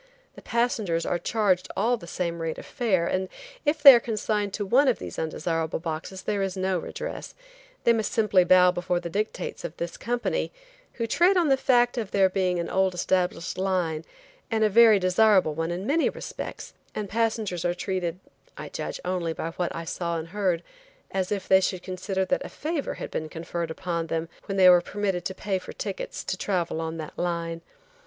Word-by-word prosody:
The - - -13
passengers 220 -8 0
are 175 - 0
charged 190 -2 +1
all 230 +5 +3
the 170 -7 -11
same 170 -1 -3
rate 165 -1 -3
of - - -9
fare, 195 -9 0
and 185 +1 -1 0.4
if 295 0 +1
they 275 -2 +13
are 240 - +6
consigned 215 -2 -1
to 205 - -3
one 265 +8 +4
of 255 - +3
these - - -7
undesirable 160 0 -2
boxes 165 +3 -5
there 205 -2 -1
is 195 -1 -2
no 185 -1 0
redress; - - -6 0.5
they 235 - +5
must 220 -2 -1
simply 210 -5 +4
bow 180 0 +6
before 175 0 -1
the 170 -1 -6
dictates 205 -1 -3
of 155 - -6
this 170 0 -4
company, 240 +1 -1 0.4
who 230 - -2
trade 350 - +3
on 340 -4 +3
the 270 - +6
fact 245 -2 +3
of 215 -4 -4
their 195 -1 +4
being 185 -1 0
an 170 - -2
old 190 -1 +1
established 180 0 0
line, 180 -5 0 0.5
and 220 -2 +1
a 215 - +4
very 225 0 +7
desirable 185 -2 +4
one 165 +2 -2
in 175 +3 -3
many 310 +7 +2
respects, - - -7 0.2
and 210 - -3
passengers 220 -4 -1
are 175 0 0
treated–I 180 -1 -5
judge - - -5
only 180 -3 -1
by 165 +1 -4
what 175 +1 -2
I 165 - -5
saw 170 0 -2
and 160 +1 -6
heard–as 200 - -3
if 200 -2 -2
they 190 0 +6
should 185 -1 -1
consider 190 +1 -2
that 275 - 0
a - - -7
favor 310 -1 -3
had - - -7
been 155 0 -3
conferred 170 +1 -4
upon 170 0 -3
them 165 0 -2 0.2
when 195 - -2
they 185 -1 +7
were 180 -1 +8
permitted 195 -2 -2
to 190 - -3
pay 195 -2 -2
for - - -10
tickets 200 -3 -5
to 185 0 -3
travel 175 -5 -1
on 160 0 -4
that 155 -2 -7
line. 170 -1 -2
185 Hz, 195 wpm, -26 LUFS, 170-215 Hz, 0.5 s, they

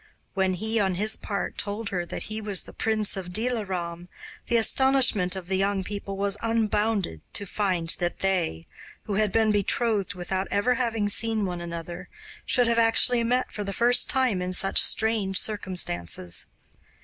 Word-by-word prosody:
When 190 -1 +1
he 220 +4 -1
on 190 -3 +1
his 215 +4 +2
part 200 -3 -4
told 205 +1 -2
her 175 -2 -3
that - - -5
he 215 +1 -5
was 205 -3 -1
the - - -11
prince 215 -2 -1
of 185 -2 -6
Dilaram, 185 -6 -2 0.4
the 235 - +3
astonishment 245 -6 +4
of 190 -2 -6
the 190 0 0
young 195 0 0
people 200 0 -6
was 200 0 +1
unbounded 215 - 0
to 200 - -1
find 185 -4 -1
that 175 0 -2
they, 180 - 0 0.4
who 205 - -4
had 210 0 +2
been 220 0 +3
betrothed 205 -1 0
without 185 +2 -3
ever 205 +5 +2
having 230 -4 -1
seen 220 0 0
one 175 -2 -4
another, 170 0 -7 0.4
should 245 -2 +4
have 230 0 +2
actually 230 +1 +4
met 250 +2 0
for 210 - -4
the 200 0 -4
first 240 +4 +4
time 255 -8 +1
in 180 0 -3
such 195 +1 +3
strange 215 -4 +1
circumstances. 90 - -2
200 Hz, 170 wpm, -26 LUFS, 185-225 Hz, 0.4 s, astonishment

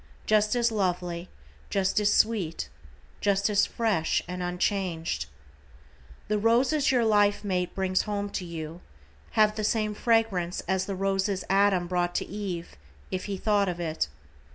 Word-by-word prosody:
Just 215 +1 +3
as 235 -1 +2
lovely, 180 -4 -1 0.4
just 195 +1 +1
as 210 0 +3
sweet, 185 - +1 0.5
just 200 +1 +2
as 205 - +3
fresh 210 -9 0
and 180 +1 -5
unchanged. 180 - -1 1.0
The 210 0 +1
roses 260 +7 +3
your 245 -3 +3
life 205 -1 +3
mate 180 -3 -1
brings 185 -1 +1
home 205 -1 -3
to 190 - -3
you, 165 0 -7 0.5
have 215 -1 +4
the 215 - -3
same 215 -1 +1
fragrance 210 -6 +1
as 190 +1 -1
the 200 - -2
roses 195 0 0
Adam 195 -2 +3
brought 175 0 -1
to - - 0
Eve, 190 -4 -5 0.4
if 185 - -3
he 200 -2 -3
thought 205 -1 +2
of 175 -1 -4
it. 160 - -1
195 Hz, 150 wpm, -27 LUFS, 180-210 Hz, 1.0 s, have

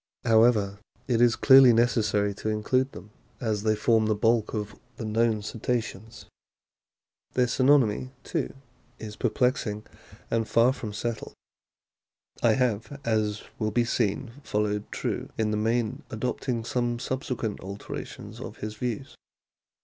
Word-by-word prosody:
How 115 -2 +5
ever, 105 -4 +3 0.3
it 120 -2 +2
is 120 -2 +5
clearly 135 -2 +8
necessary 105 -3 +2
to 110 - -4
include 130 +5 +1
them, 95 +4 -11 0.3
as 110 -3 -1
they 110 0 +2
form 110 +1 +2
the 110 - +2
bulk 115 +1 +2
of 105 -1 -3 0.2
the 115 - -5
known 110 0 +1
Cetaceans. 115 -1 -4 1.1
Their 125 - +3
synonymy, 130 -2 +3
too, - - -3 0.4
is 105 -1 -8
perplexing 120 -6 0 0.5
and 115 -1 +1
far 120 +3 +4
from 110 -5 -6
settled. 110 +2 -4 1.1
I - - +5
have, 125 +2 -1
as 110 -2 0 0.2
will 110 -2 0
be 120 +2 +1
seen, 115 +2 -1
followed 105 -2 -1
True - - -3
in 110 -1 +1
the - - 0
main, 115 +1 0
adopting 120 +1 -2
some 120 -1 -1
subsequent 125 -3 -3
alterations 100 +2 -8
of - - -8
his 105 0 -5
views. 125 +3 -4
115 Hz, 135 wpm, -27 LUFS, 105-120 Hz, 1.1 s, clearly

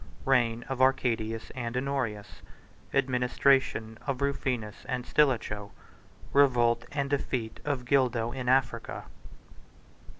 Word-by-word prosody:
—Reign 120 -3 +2
Of 135 -1 -3
Arcadius 115 -4 +1
And 120 -1 -4
Honorius—Administration 125 0 -1
Of 135 -2 -1
Rufinus 125 -6 -2
And 125 -2 -2
Stilicho.—Revolt 120 0 +1
And 140 -2 -1
Defeat 130 -5 -2
Of 140 -4 -2
Gildo 120 -3 +2
In 125 -1 -3
Africa. 130 +1 0
125 Hz, 90 wpm, -29 LUFS, 115-135 Hz, -, Reign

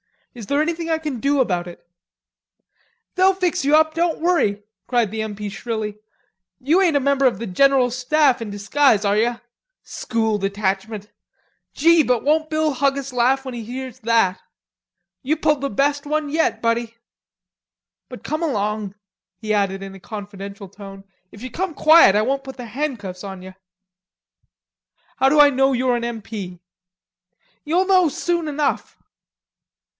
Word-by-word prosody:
Is 230 -5 -10
there 285 +1 +1
anything 330 +1 -2
I 320 - +1
can 300 -6 -5
do 280 +2 +2
about 180 -7 -1
it?" 175 - -12 1.3
"They'll 380 +1 +4
fix 360 -6 -1
you 290 +2 +4
up, 315 0 +3
don't 335 -1 -1
worry," 270 - +1 0.2
cried 240 -5 +1
the 220 0 -3
M. 215 -1 -5
P. 210 0 -6
shrilly. 210 0 -5 0.6
"You 310 - +2
ain't 345 -5 +2
a - - +4
member 275 0 +2
of 245 -6 +3
the 230 - -5
General 255 +5 +3
Staff 260 +1 +2
in 225 - -5
disguise, 210 +3 +2
are 200 0 +2
ye? 235 +2 +1 0.5
School 220 -2 -2
Detachment! 200 +1 -3 0.6
Gee, 335 +2 +5
won't 300 +5 +1
Bill 310 -1 0
Huggis 275 0 -1
laugh 255 +2 +2
when 260 - -6
he 235 -1 -6
hears 255 +2 -7
that? 225 -5 +1 0.8
You 295 +3 0
pulled 300 -2 +1
the 280 - -2
best 285 +6 0
one 300 0 -1
yet, 295 -7 0
buddy.... 230 0 -1 1.1
But - - -10
come 310 +2 -3
along," 210 - -2 0.4
he 215 +1 -3
added 195 -1 0
in 195 0 -8
a 195 - -12
confidential 200 0 -9
tone. 195 0 -11 0.3
"If 205 - -12
you 255 - -7
come 355 +3 -3
quiet 310 -11 +6
I 210 - +3
won't 275 +3 -2
put 265 0 -9
the 245 - -7
handcuffs 215 -8 -5
on 190 -2 -8
ye." 190 0 -10 1.6
"How 265 - +4
do 300 +2 +3
I 290 -1 +7
know 270 0 +2
you're 250 -1 +1
an 235 - -3
M. 235 -2 -5
P.?" 190 -5 -7 1.1
"You'll 345 +5 +1
know 370 -2 +4
soon 340 +3 -2
enough." 295 -1 -2
250 Hz, 160 wpm, -21 LUFS, 210-300 Hz, 1.6 s, I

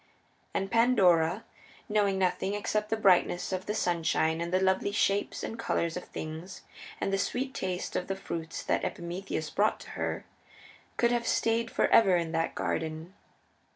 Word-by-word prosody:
And 195 0 -1
Pandora, 195 -6 +4 0.4
knowing 205 -2 +2
nothing 190 +1 0
except 210 +1 -1
the 220 - 0
brightness 185 -2 +3
of 185 0 -3
the 210 - -1
sunshine 165 -1 +1
and 170 0 -3
the 185 - +3
lovely 190 +1 +1
shapes 200 -1 0
and 225 - -5
colors 170 -7 -1
of 180 - -5
things 160 +4 -7 0.4
and 195 - -1
the 195 - +2
sweet 260 +5 -2
taste 185 -5 -3
of 180 - -1
the 195 - -2
fruits 165 -4 -5
that - - 0
Epimetheus 170 -2 -4
brought 210 +2 +2
to - - -11
her, - - -3 0.7
could 235 0 +3
have 240 -1 0
stayed 230 0 +1
forever 195 -5 +4
in 165 -2 -2
that 165 0 -1
garden. 160 +3 -3
190 Hz, 160 wpm, -29 LUFS, 170-210 Hz, 0.7 s, Pandora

